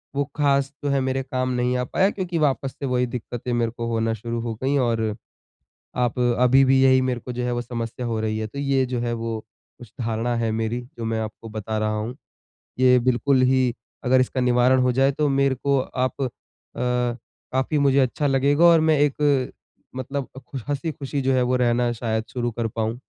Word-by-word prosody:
वो 140 - +2
खास 140 -2 +2
जो 145 - 0
है 140 - +2
मेरे 130 0 -1
काम 130 -1 -2
नहीं 125 0 0
आ 125 - 0
पाया 190 +9 +2
क्योंकि 180 -4 -3
वापस 135 -2 +1
से 140 - -3
वही 125 -1 +1
दिक्कतें 120 0 -5
मेरे 115 -1 0
को 115 0 -3
होना 115 -1 0
शुरू 115 +2 -4
हो 115 -1 -4
गई 140 +2 +2
और, 115 -4 0 0.8
आप 125 -1 0
अभी 125 +2 +4
भी 130 0 +4
यही 130 -1 +5
मेरे 125 -2 -1
को 125 - -7
जो 125 0 -3
है 125 - -1
वो 120 0 -1
समस्या 120 0 -5
हो 115 -1 -1
रही 110 0 -1
है। 110 - -2
तो 140 +6 -9
ये 135 -2 +1
जो 125 0 -3
है 120 0 -1
वो 115 -1 -4 0.4
उस 120 -4 -13
धारणा 115 +1 -1
है 115 -1 0
मेरी 115 +2 -1 0.2
जो 115 - -4
मैं 115 0 -1
आपको 110 +1 -6
बता 110 0 -3
रहा 110 0 0
हूँ। 110 +4 -4 0.6
ये 125 0 +6
बिल्कुल 130 +2 +2
ही 130 -1 +3 0.3
अगर 130 +1 +4
इसका 130 0 0
निवारण 125 +1 +4
हो 125 - +2
जाए 135 +2 +3
तो 150 +1 0
मेरे 135 -1 +2
को 140 +2 +1
आप 130 +1 -2
अ, 130 - +1 1.2
काफ़ी 135 +4 0
मुझे 140 -1 +3
अच्छा 135 +3 0
लगेगा 140 +4 +3
और 170 -1 +7
मैं 155 -1 +3
एक 145 -2 +2 0.4
मतलब 135 +1 -4
अ, 135 - -8
खु 135 +2 -8
हँसी-खुशी 145 -1 -3
जो 130 0 +2
है 125 - +3
वो 125 +1 +1
रहना 120 -1 +2
शायद 110 -1 -2
शुरू 120 -1 -1
कर 115 0 -2
पाऊँ। 110 +1 -3
125 Hz, 210 wpm, -23 LUFS, 115-135 Hz, 1.2 s, और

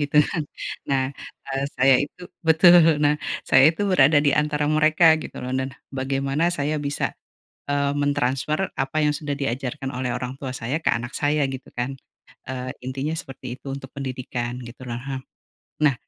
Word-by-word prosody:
gitu 145 0 -1
kan 160 - -2 0.5
nah, 135 -1 +2 0.5
eee, 135 0 -1
saya 135 +1 +6
itu 150 - -17 0.3
betul 165 -1 +7
nah 145 - +4 0.3
saya 130 +1 +7
itu - - -9
berada 145 -3 +6
di 145 - +5
antara 150 0 -1
mereka 155 +2 +4 0.2
gitu - - -9
loh 125 - -4
dan 130 0 -1 0.2
bagaimana 135 +3 -1
saya 155 -3 -1
bisa, 145 0 -2 0.6
eee, 140 0 +1
mentransfer 145 +4 0
apa 135 +3 -2
yang 150 0 +2
sudah 145 -2 -3
diajarkan 135 0 -3
oleh 125 -1 -3
orang 125 +2 -4
tua 135 -2 -5
saya 125 +4 -2
ke - - +4
anak 120 +2 -3
saya 145 0 +2
gitu 130 0 -7
kan, 120 +2 -2 0.6
eee, 130 0 -4 0.2
intinya 135 +4 -2
seperti 135 -1 -9
itu - - -19
untuk 135 -1 -8
pendidikan 130 -2 -4
gitu 120 +2 -11
loh, 120 - -4 0.9
nah 150 -3 +4
140 Hz, 165 wpm, -24 LUFS, 130-150 Hz, 0.9 s, betul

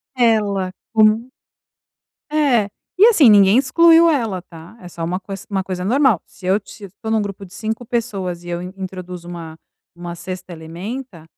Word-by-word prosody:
Ela 210 -6 +1 0.2
com, 220 +2 +3 1.0
é, 265 -9 +2 0.3
e 410 - +8
assim 330 - +6
ninguém 200 +2 +6
excluiu 330 +5 +5
ela 225 - -1
tá? 165 +3 -14
É 180 - -10
só 170 -1 -6
uma 180 +3 -2
coisa 195 0 -8
uma 195 -2 -1
coisa 180 -1 -4
normal. 250 - +3
Se 180 - -12
eu 190 - +3
estou 205 +1 -10
num 220 -1 +2
grupo 200 -1 -6
de 180 - -17
5 220 +2 -4
pessoas 195 -7 -3
e - - -10
eu 175 0 -3
introduzo 180 -2 -8
uma 165 -2 -8 0.4
uma 175 0 -7
6ª 185 0 -7
elementa, 170 +4 -8
195 Hz, 165 wpm, -19 LUFS, 180-230 Hz, 1.0 s, e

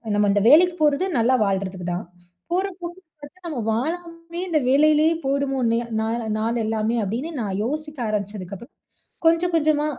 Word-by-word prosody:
நம்ம 205 0 +3
இந்த 205 - +2
வேலைக்கு 345 +4 +6
போறது 295 +4 +3
நல்லா 250 +3 +3
வாழ்றதுக்குதான். 185 -2 -2 0.5
போற 370 +3 +1 0.2
போக்க 345 +1 -6 0.2
பார்த்தா 290 +6 -13
நம்ம 295 -7 -4
வாழாமயே 335 +5 -4
இந்த 310 -2 +2
வேலையிலேயே 305 +3 +4
போயிடுமோன்னு 270 -4 +1 0.2
நா 220 - -1 0.3
நாளெல்லாமே 225 0 0
அப்டின்னு 240 - -3
நா - - -2 0.2
யோசிக்க 300 +2 -4
ஆரம்பிச்சதுக்கப்புறம் 200 0 -5 0.5
கொஞ்சம் 335 +2 +3
கொஞ்சமா 305 -1 +2
280 Hz, 130 wpm, -23 LUFS, 220-325 Hz, 0.5 s, வேலைக்கு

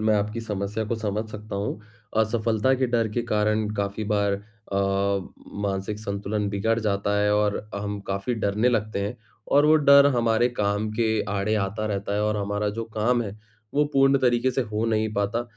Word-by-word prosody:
मैं 110 0 +3
आपकी 105 +3 -2
समस्या 105 0 -3
को 115 - 0
समझ 105 0 -2
सकता 105 -1 -6
हूँ। 100 +1 -3 0.4
असफलता 110 +2 +2
के 130 0 +1
डर 120 -2 +1
के 120 - 0
कारण 105 -1 +1
काफ़ी 100 +1 -2
बार 100 -1 +2 0.4
अ, 100 - 0 0.9
मानसिक 100 +1 -2
संतुलन 100 0 -2
बिगड़ 110 +3 0
जाता 100 -1 0
है 105 0 +2
और 105 -1 +2 0.2
अ, 100 - -2
हम 100 0 -3
काफ़ी 100 +5 -2
डरने 105 +2 +1
लगते 110 -3 0
हैं 100 +1 -3 0.4
और 145 +1 +6
वो 155 - +6
डर 140 -1 +7
हमारे 115 0 +3
काम 105 +1 0
के 115 +1 +1 0.2
आड़े 105 +2 0
आता 105 +1 -1
रहता 100 -1 -2
है 105 - +1
और 105 0 0
हमारा 105 +1 -1
जो 115 +2 -4
काम 120 +3 +2
है, 105 -2 -6 0.4
वो 150 +1 +4
पूर्ण 135 0 +4
तरीके 125 0 +2
से 130 - -1
हो 110 0 -2
नहीं 110 -1 0
पाता। 100 +4 0
105 Hz, 190 wpm, -25 LUFS, 100-115 Hz, 0.9 s, डर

